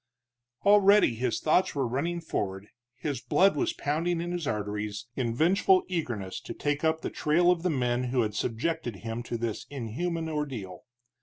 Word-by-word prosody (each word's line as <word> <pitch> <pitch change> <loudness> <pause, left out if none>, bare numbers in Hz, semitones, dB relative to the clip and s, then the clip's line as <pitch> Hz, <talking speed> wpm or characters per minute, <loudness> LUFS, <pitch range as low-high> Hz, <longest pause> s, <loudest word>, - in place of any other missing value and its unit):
Already 205 - +6
his 120 +1 -1
thoughts 160 +3 +2
were 135 -3 0
running 165 +8 -2
forward, 95 -10 -3 0.3
his 135 -1 -3
blood 185 - +3
was 355 -1 +1
pounding 165 - -1
in 175 +1 -3
his 175 -4 -3
arteries, 105 -1 -3
in 120 -3 -1
vengeful 185 +5 +4
eagerness 120 - -3
to - - -7
take 145 +1 -1
up 160 0 +2
the - - -4
trail 175 +4 +3
of 175 -2 0
the 180 - 0
men 125 -4 0
who 125 -1 +1
had 105 -1 -2
subjected 120 +3 -2
him 115 +1 -3
to 120 0 -4
this 115 -2 -4
inhuman 160 +7 -3
ordeal. 130 - -4
145 Hz, 170 wpm, -28 LUFS, 115-170 Hz, 0.3 s, Already